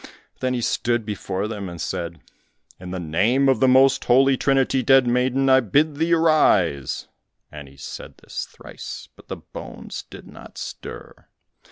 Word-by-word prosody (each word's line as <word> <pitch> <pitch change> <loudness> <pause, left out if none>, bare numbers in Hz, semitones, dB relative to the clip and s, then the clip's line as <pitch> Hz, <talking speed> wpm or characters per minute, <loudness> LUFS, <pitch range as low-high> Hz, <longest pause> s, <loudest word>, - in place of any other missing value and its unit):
Then 130 -1 -1
he 120 - -2
stood 120 -1 0
before 100 -1 -3
them 105 -4 -5
and 85 -1 -9
said, 85 -1 -4 0.6
"In 90 0 -9
the 95 0 -4
name 100 - +2
of 135 -4 +3
the 130 - +4
most 130 +1 +4
holy 135 +2 +5
Trinity, 135 0 +2
dead 135 -1 +5
maiden, 125 +2 +1
I 130 0 +6
bid 145 +6 +1
thee 165 +2 0
arise," 100 - +2 0.4
and 75 -2 -9
he 70 0 -17
said 70 - -9
this - - -6
thrice, - - -9
but - - -19
the - - -5
bones - - -9
did - - -11
not - - -13
stir. - - -9
125 Hz, 165 wpm, -22 LUFS, 95-135 Hz, 0.6 s, I